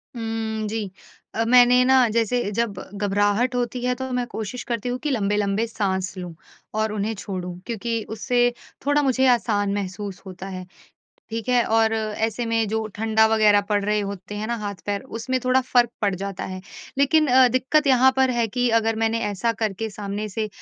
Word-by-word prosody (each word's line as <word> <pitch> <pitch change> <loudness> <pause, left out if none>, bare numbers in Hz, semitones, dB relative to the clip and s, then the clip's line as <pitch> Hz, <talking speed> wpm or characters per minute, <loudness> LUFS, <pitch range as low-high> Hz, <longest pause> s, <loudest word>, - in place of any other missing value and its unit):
हुँ। 225 -1 -3
जी, 210 -3 -3 0.6
मैंने 250 +1 +6
ना 260 -1 +5
जैसे 230 +2 +1
जब 225 -1 -1 0.2
घबराहट 205 +5 +1
होती 245 0 -2
है 250 0 +1
तो 260 +1 -5
मैं 250 -1 0
कोशिश 220 +3 -5
करती 235 0 -3
हूँ 245 - -1
कि 300 - -2
लंबे-लंबे 205 -1 0
साँस 190 -4 -2
लूँ 180 -2 -6 0.4
और 220 0 +1
उन्हें 215 +2 -1
छोड़ूँ। 180 -3 -6
क्योंकि 230 0 -3
उससे 245 +3 +1 0.4
थोड़ा 290 +1 +3
मुझे 265 -1 +2
आसान 205 -4 +1
महसूस 200 -1 -5
होता 190 0 -8
है। 185 -1 -6 0.7
ठीक 225 +2 -4
है? 245 -1 +4
और 225 0 +2
ऐसे 220 +1 -2
में 225 -2 +1
जो 220 0 -1
ठंडा 220 0 +3
वग़ैरह 215 -2 +5
पड़ 205 -1 +1
रहे 210 +1 +1
होते 200 0 -6
हैं 210 +1 -3
न - - -3
हाथ-पैर 200 0 -4
उसमें 255 +3 -1
थोड़ा 255 +1 +4
फ़र्क 245 -2 +2
पड़ 200 -2 +2
जाता 195 0 -5
है। 185 0 -6 0.4
लेकिन 305 +3 +4 0.3
दिक्कत 280 +4 +2
यहाँ 260 0 +6
पर 265 -1 +3
है 235 -2 +1
कि 245 +2 0
अगर 225 0 0
मैंने 225 +1 +1
ऐसा 210 +3 0
करके 220 -1 -2
सामने 205 +1 -4
से 215 +2 -3
220 Hz, 180 wpm, -23 LUFS, 205-245 Hz, 0.7 s, मैंने